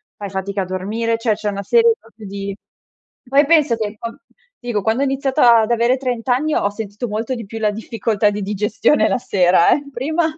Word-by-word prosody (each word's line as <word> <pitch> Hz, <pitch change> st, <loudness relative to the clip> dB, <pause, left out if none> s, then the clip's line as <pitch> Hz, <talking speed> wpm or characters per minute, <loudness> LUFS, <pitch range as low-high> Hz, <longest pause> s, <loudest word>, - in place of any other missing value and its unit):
fai 200 Hz, -1 st, -7 dB
fatica 195 Hz, +1 st, -3 dB
a -, -, -2 dB
dormire, 215 Hz, +5 st, -2 dB
cioè, 230 Hz, -1 st, +1 dB
c'è 210 Hz, 0 st, -3 dB
una 200 Hz, 0 st, -4 dB
serie 460 Hz, -, +4 dB
proprio 225 Hz, -2 st, -14 dB
di 200 Hz, 0 st, -5 dB, 0.7 s
Poi, 280 Hz, +3 st, +3 dB
penso 305 Hz, -7 st, +3 dB
che 215 Hz, -1 st, -4 dB
con 230 Hz, 0 st, -6 dB, 0.4 s
ti 245 Hz, -, -16 dB
dico, 205 Hz, -3 st, -1 dB
quando 225 Hz, +5 st, 0 dB
ho -, -, +3 dB
iniziata 265 Hz, -3 st, +3 dB
ad 220 Hz, +2 st, -1 dB
avere 235 Hz, +2 st, +2 dB
30 245 Hz, -3 st, -3 dB
anni, 285 Hz, +5 st, +1 dB
ho 205 Hz, -, +1 dB
sentito 210 Hz, +3 st, -6 dB
molto 225 Hz, +4 st, -3 dB
di 230 Hz, -, -7 dB
più 225 Hz, +2 st, -7 dB
la 210 Hz, -1 st, +2 dB
difficoltà 215 Hz, -1 st, -1 dB
di 205 Hz, -, -4 dB
digestione 210 Hz, +8 st, +1 dB
la -, -, 0 dB
sera, 185 Hz, -8 st, +3 dB
eh. 290 Hz, -, -4 dB
Prima 315 Hz, +7 st, -1 dB
225 Hz, 210 wpm, -19 LUFS, 205-255 Hz, 0.7 s, serie